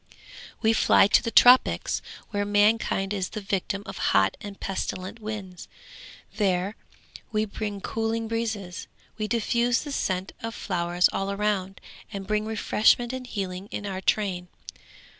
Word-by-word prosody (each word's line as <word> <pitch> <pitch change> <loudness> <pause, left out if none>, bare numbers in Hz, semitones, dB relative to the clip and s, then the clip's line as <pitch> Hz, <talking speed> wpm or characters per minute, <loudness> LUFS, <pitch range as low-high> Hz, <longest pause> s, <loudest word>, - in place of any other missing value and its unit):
We 220 0 +4
fly - - +5
to 200 - +4
the - - -2
tropics 250 +2 +5 0.3
where 205 -1 0
mankind 205 -1 +2
is 190 -3 -2
the 215 - -5
victim 200 0 -2
of - - -7 0.2
hot 95 0 +3
and 205 -1 -8
pestilent 190 +2 -4
winds; 210 -4 -7 0.7
there 195 0 +1 0.6
we 215 -1 +1
bring 205 -1 -5
cooling 225 +1 -2
breezes. 220 -6 -3 0.3
We 215 - -1
diffuse 235 +2 +1
the 295 - -6
scent 185 -8 -1
of 230 0 -5
flowers 175 -2 +1
all 195 0 -1
around, 200 -2 -1 0.3
and 200 -2 -5
bring 210 +1 -1
refreshment 220 +2 +2
and 255 -1 -5
healing 190 -3 -4
in 205 - -5
our 190 -1 -4
train. 190 -3 0
205 Hz, 140 wpm, -26 LUFS, 190-220 Hz, 0.7 s, fly